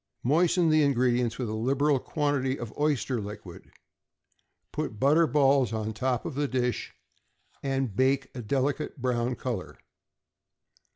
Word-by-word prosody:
Moisten 170 Hz, +5 st, +3 dB
the 155 Hz, 0 st, +4 dB
ingredients 125 Hz, -4 st, +2 dB
with 125 Hz, -, -3 dB
a 110 Hz, -, -3 dB
liberal 135 Hz, +5 st, +1 dB
quantity 140 Hz, -2 st, -1 dB
of 115 Hz, -2 st, -7 dB
oyster 140 Hz, -5 st, 0 dB
liquid, 100 Hz, -3 st, -9 dB, 1.0 s
put 150 Hz, -1 st, -2 dB
small 110 Hz, -, -14 dB
butter 150 Hz, +7 st, +4 dB
balls 135 Hz, -5 st, +3 dB
on 110 Hz, -1 st, -3 dB
top 125 Hz, +2 st, -1 dB
of -, -, -4 dB
the 145 Hz, +2 st, -1 dB
dish, 125 Hz, -2 st, -2 dB, 0.7 s
and 135 Hz, -6 st, -1 dB
bake 135 Hz, +2 st, +1 dB
a 125 Hz, -, -6 dB
delicate 140 Hz, +5 st, -1 dB
brown 125 Hz, -1 st, 0 dB
color. 120 Hz, -9 st, -5 dB
130 Hz, 135 wpm, -28 LUFS, 120-145 Hz, 1.0 s, the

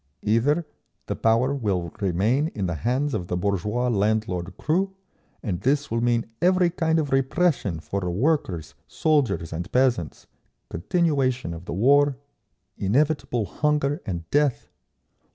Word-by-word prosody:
Either—the 145 Hz, +9 st, -1 dB
power 115 Hz, +5 st, +2 dB
will 95 Hz, -, -1 dB
remain 105 Hz, -, +1 dB
in 100 Hz, -, -2 dB
the 85 Hz, -, -1 dB
hands 125 Hz, -, -1 dB
of 90 Hz, -6 st, -3 dB
the 90 Hz, -, -2 dB
bourgeois 105 Hz, +6 st, 0 dB
landlord 105 Hz, -4 st, 0 dB
crew, 190 Hz, +5 st, 0 dB, 0.5 s
and 95 Hz, -6 st, -3 dB
this 140 Hz, +3 st, +1 dB
will 115 Hz, 0 st, 0 dB
mean 120 Hz, -1 st, +1 dB, 0.2 s
every 180 Hz, -1 st, +3 dB
kind 165 Hz, -2 st, +1 dB
of 150 Hz, -3 st, -1 dB
repression 135 Hz, -, +1 dB
for 80 Hz, +6 st, -4 dB
the 90 Hz, -, -2 dB
workers, 95 Hz, -, 0 dB
soldiers 145 Hz, -, 0 dB
and 85 Hz, +1 st, -5 dB
peasants, 125 Hz, -, +1 dB, 0.5 s
continuation 130 Hz, -, 0 dB
of 85 Hz, +1 st, -9 dB
the -, -, -5 dB
war, 140 Hz, +7 st, +4 dB, 0.6 s
inevitable 125 Hz, +1 st, +1 dB
hunger 150 Hz, -, 0 dB
and 85 Hz, -4 st, -5 dB
death…. 145 Hz, -3 st, +1 dB
120 Hz, 135 wpm, -24 LUFS, 95-145 Hz, 0.6 s, war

